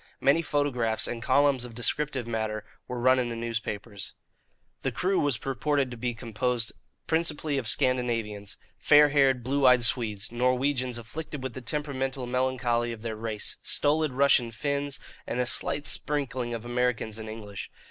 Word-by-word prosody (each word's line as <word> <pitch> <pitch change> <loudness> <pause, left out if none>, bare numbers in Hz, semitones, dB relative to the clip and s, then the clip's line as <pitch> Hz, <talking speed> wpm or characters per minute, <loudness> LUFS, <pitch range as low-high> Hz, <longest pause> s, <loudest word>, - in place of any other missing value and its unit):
Many 140 +5 +4
photographs 130 -8 +1
and 120 -1 -4
columns 135 +1 +3
of 120 -2 -8
descriptive 130 +2 -1
matter 110 -2 -3 0.2
were 125 -1 -4
run 130 +2 +4
in 120 -1 0
the 115 - -4
newspapers. 110 -3 -4 0.7
The - - -1
crew 190 +1 +1
was 140 -7 0
reported 135 +1 0
to - - -5
be 120 0 -2
composed 115 0 -1 0.3
principally 155 -3 0
of 120 - -4
Scandinavians 115 -5 0 0.2
fair 150 +7 +6
haired, 135 -3 +3
blue 135 +2 +2
eyed 125 -1 +6
Swedes, 115 -3 +1
Norwegians 125 +1 +1
afflicted 145 +4 -7
with 130 -2 -4
the 130 - -7
temperamental 135 -1 -2
melancholy 125 -2 0
of 115 -1 -8
their 115 -1 -3
race, 110 -1 -4
stolid 150 -1 +2
Russian 135 -3 +4
Finns, 140 +4 -2 0.3
and 120 - -2
a 125 - +2
slight 145 +3 0
sprinkling 130 -5 +1
of 115 0 -7
Americans 120 -3 -1
and 110 0 -6
English. 105 -2 -7
125 Hz, 155 wpm, -28 LUFS, 115-140 Hz, 0.7 s, fair